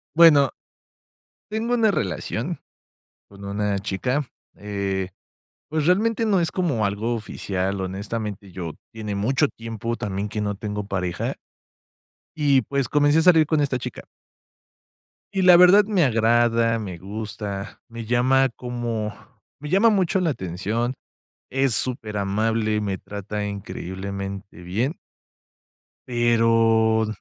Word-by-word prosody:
Bueno, 150 -5 +7 1.0
tengo 225 +3 -1
una 225 -3 +4
relación 115 - -3 0.7
con 100 0 -13
una 100 0 -1
chica, 125 +9 -1 0.3
eh, 100 -2 -3 0.6
pues, 155 -1 0
realmente, 225 +5 +2
no 200 -4 +3
es 165 -2 +1
como 145 - 0
algo 105 +4 -1
oficial, 95 -3 -3
honestamente, 100 +1 -5
yo, 85 -3 -5 0.2
tiene 110 -2 -5
mucho 130 +9 +2
tiempo, 115 0 -5
también, 100 0 -3
que 110 - -4
no 105 -1 -1
tengo 105 0 -4
pareja, 90 -3 -2 1.0
y, 140 -4 +3
pues, 140 +1 -1
comencé 145 +1 +3
a - - +4
salir 160 -3 +6
con 155 0 +1
esta 135 -3 0
chica. - - -7 1.3
Y 190 - +2
la 180 -1 +8
verdad 180 +4 +7
me 200 -6 +3
agrada, 115 -1 +3
me 95 -5 -5
gusta, 100 +1 -6
me 115 -1 -7
llama 130 +3 +3
como 120 -3 -3 0.5
me 150 - -7
llama 195 +7 +5
mucho 190 -2 +2
la 175 -3 +1
atención, 110 - -2 0.6
es 135 -1 +1
superamable, 110 -2 -1
me 100 -3 -2
trata 105 +1 -5
increíblemente 100 -1 -6
bien 110 - -2 1.1
pero, 115 -2 +3
115 Hz, 120 wpm, -23 LUFS, 100-140 Hz, 1.3 s, la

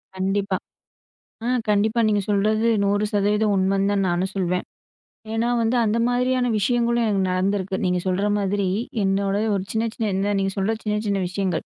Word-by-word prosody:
கண்டிப்பா. 195 0 0 0.9
ஆ, - - -1 0.2
கண்டிப்பா. 215 +3 +2
நீங்க 205 -1 +2
சொல்றது 215 +2 +2 0.2
100% 205 +1 +1
உண்மைன்னு 195 +1 +1
தான் 195 -1 +1
நானும் 180 +3 -1
சொல்வேன். 180 -1 -1 0.7
ஏன்னா 225 +1 0
வந்து 230 +2 +1
அந்த 215 +1 +1
மாரியான 250 +1 +1
விஷயங்களும் 235 +2 +1
எனக்கு 200 -3 +1
நடந்திருக்கு. 190 +1 -1
நீங்க 180 0 +1
சொல்ற 185 +2 0
மாதிரி, 200 0 0 0.4
என்னோட 195 +1 +1 0.2
ஒரு 195 -2 -1
சின்ன 220 +1 0
சின்ன 220 -2 -2
இந்த 195 +2 0
நீங்க 195 0 0
சொல்ற 195 +3 +1
சின்ன 210 -1 -1
சின்ன 200 -1 0
விஷயங்கள். 185 -2 -2
200 Hz, 155 wpm, -23 LUFS, 195-215 Hz, 0.9 s, கண்டிப்பா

